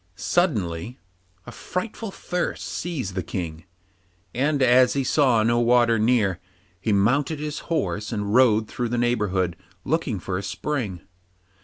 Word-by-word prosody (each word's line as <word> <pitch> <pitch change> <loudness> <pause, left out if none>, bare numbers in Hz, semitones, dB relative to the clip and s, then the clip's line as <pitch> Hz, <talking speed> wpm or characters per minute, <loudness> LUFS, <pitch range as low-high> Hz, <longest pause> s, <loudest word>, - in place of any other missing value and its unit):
Suddenly 110 - -1 0.5
a - - -8
frightful 210 +4 -5
thirst 180 -2 -3
seized 140 - -4
the 95 - -2
King, 85 -2 -5 0.7
and 140 +2 +1
as 125 0 +5
he 140 - 0
saw 125 -5 +3
no 120 +1 +2
water 120 -1 +4
near, 105 -5 +2 0.4
he 110 +3 -1
mounted 125 +10 +2
his 150 0 -4
horse, 105 - -1
and 105 -2 -2
rode 110 -4 +4
through 120 +1 -3
the 120 - -1
neighbourhood 105 -7 0 0.3
looking 150 -7 0
for 90 +1 -3
a - - -6
spring. 100 - -3
120 Hz, 140 wpm, -24 LUFS, 100-140 Hz, 0.7 s, as